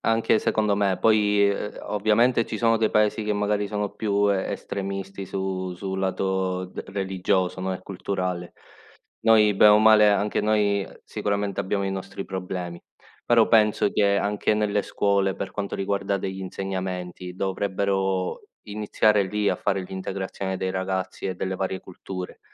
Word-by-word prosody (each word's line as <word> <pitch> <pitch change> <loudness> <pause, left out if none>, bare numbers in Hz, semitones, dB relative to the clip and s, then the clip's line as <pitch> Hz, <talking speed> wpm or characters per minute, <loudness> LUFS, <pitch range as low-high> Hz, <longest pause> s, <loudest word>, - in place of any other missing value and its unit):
Anche 115 -1 +2
secondo 105 -2 +1
me. 100 -2 +1
Poi, 105 -2 +4
uhm, 100 +1 -3
ovviamente 110 +3 +2
ci 110 - -5
sono 115 0 +3
dei 110 -1 +1
Paesi 105 +1 +2
che 105 0 -1
magari 105 0 0
sono 105 -1 -2
più 100 -1 +1
e 95 -1 -1
estremisti 100 0 -5
su 95 -1 -3
sul 95 +1 -4
lato 95 -1 -1
d 90 - -7
religioso, 95 -1 -1
no, 95 0 -2
e 90 - -4
culturale. 90 -2 -4 0.7
Noi 105 -2 +5
bene 105 +2 +7
o 105 - +6
male, 110 -1 +7
anche 105 +1 +1
noi, 105 -1 +2
ehm, - - -12
sicuramente 100 -1 -2
abbiamo 100 +1 -1
i 95 - -1
nostri 95 0 -6
problemi, 90 -2 -5 0.4
però 115 -2 +5
penso 105 -2 +4
che 100 -1 +3
anche 105 +2 +1
nelle 105 -1 +1
scuole, 100 -1 +1
per 95 - -5
quanto 100 -1 -3
riguarda 100 0 -1
degli 95 0 -4
insegnamenti, 90 -1 -5
dovrebbero 95 -1 -1 0.2
iniziare 105 0 +1
lì 105 +2 0
a - - -1
fare 95 -1 -1
l'integrazione 95 0 -4
dei 95 0 -2
ragazzi 95 0 -3
e 95 - -2
delle 95 +1 -2
varie 95 0 -2
culture, 90 0 -8
100 Hz, 155 wpm, -25 LUFS, 95-105 Hz, 0.7 s, bene